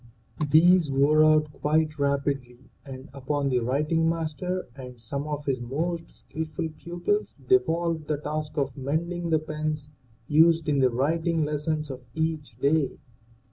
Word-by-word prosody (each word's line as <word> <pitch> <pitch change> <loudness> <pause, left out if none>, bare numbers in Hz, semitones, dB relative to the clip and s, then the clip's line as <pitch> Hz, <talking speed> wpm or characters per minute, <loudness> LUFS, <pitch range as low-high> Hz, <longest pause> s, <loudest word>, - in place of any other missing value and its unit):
These 170 +2 +5
wore 145 +3 +4
out 155 -1 +4
quite 155 0 0
rapidly 140 -3 -2
and 135 0 -9
upon 140 +1 -1
the 125 -2 +2
writing 150 +7 +1
master 165 +3 -3
and 125 -3 -10
some 140 +6 -4
of 150 -1 -4
his 130 -3 -1
most 165 +7 -3
skillful 160 +1 -5
pupils 175 - -2
devolved 170 - +2
the 150 - 0
task 150 +1 -4
of 135 -3 -1
mending 170 +5 -2
the 160 - +4
pens 155 -1 -4 0.4
used 160 +2 +4
in 145 -2 +2
the 130 -1 +4
writing 160 +6 0
lessons 150 0 -2
of 130 -1 -8
each 160 -6 -2
day. 140 +2 +1
150 Hz, 140 wpm, -26 LUFS, 140-160 Hz, 0.4 s, These